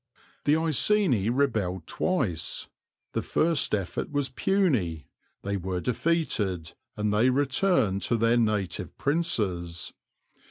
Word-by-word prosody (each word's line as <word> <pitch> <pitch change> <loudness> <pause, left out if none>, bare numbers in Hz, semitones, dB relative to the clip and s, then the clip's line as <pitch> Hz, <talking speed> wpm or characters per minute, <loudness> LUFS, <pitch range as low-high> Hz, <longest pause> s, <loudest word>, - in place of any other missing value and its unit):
The 145 - +4
Iceni 160 - +3
rebelled 110 - 0
twice. 110 - -1 0.5
The - - 0
first 160 -7 +1
effort 100 +6 -4
was 145 -2 0
puny; 125 - 0 0.4
they 100 0 -1
were 95 0 -3
defeated, 105 - -1 0.2
and 105 0 0
they 110 +5 +4
returned 135 - +2
to 120 - +1
their 115 +2 +3
native 105 -6 -1
princes. 100 - -1
115 Hz, 110 wpm, -27 LUFS, 95-150 Hz, 0.5 s, The